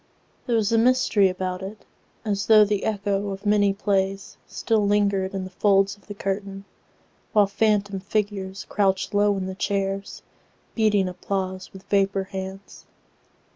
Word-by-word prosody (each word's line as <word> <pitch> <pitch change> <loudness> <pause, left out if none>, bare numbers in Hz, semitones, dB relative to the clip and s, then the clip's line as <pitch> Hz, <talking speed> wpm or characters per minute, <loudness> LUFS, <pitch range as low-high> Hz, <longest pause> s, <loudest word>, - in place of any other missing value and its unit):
There 240 - +1
was 220 -1 +1
a 225 - +4
mystery 230 -5 +3
about 185 0 -4
it, 200 +3 -8 0.4
As 200 -2 -1
though 215 -1 +7
the 205 -1 -1
echo 205 -1 -1
of 195 +1 -7
many 205 -1 +3
playsStill 195 +2 -1
lingered 200 -2 +1
in 190 - -3
the 185 - -8
folds 195 +1 +2
of 205 - -26
the 205 - -7
curtain, 195 0 -4 0.7
While 210 -2 +5
phantom 205 -1 0
figures 195 -1 -3
crouched 195 0 0
low 205 0 +3
in 190 - -3
the 190 - -4
chairs, 195 0 -3 0.5
Beating 210 -4 +2
applause 185 +1 -4
with 190 0 -12
vapor 195 -1 +1
hands. 190 +1 -8
200 Hz, 145 wpm, -24 LUFS, 195-205 Hz, 0.7 s, though